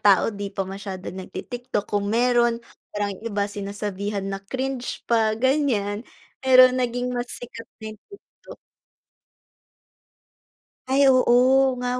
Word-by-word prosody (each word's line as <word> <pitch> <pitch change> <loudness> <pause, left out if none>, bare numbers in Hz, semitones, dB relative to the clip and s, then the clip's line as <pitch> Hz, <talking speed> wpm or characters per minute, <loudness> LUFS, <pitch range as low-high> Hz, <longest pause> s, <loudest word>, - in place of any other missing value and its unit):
tao 200 -2 +5
'di 200 0 -5
pa 195 - 0
masyado 190 -1 -7
nagti-TikTok. 240 +4 -5
Kung 205 0 -2
mayro'n, 240 +1 +3 0.3
parang 205 -1 -2
yung 195 - -12
iba 205 -1 -1
sinasabihan 200 0 -4
na 195 0 -4
cringe 260 +4 -4
pa, 220 -2 +2
ganyan 240 -6 +1 0.4
pero 255 -1 +7
naging 250 0 -1
mas 245 0 -3
sikat 230 -1 -10
na 220 -1 -8
yung 215 - -17
TikTok. 400 - -15 2.3
Ay 275 +2 +3
oo, 250 -1 +4 0.5
nga 250 0 -1
225 Hz, 125 wpm, -23 LUFS, 200-250 Hz, 2.3 s, pero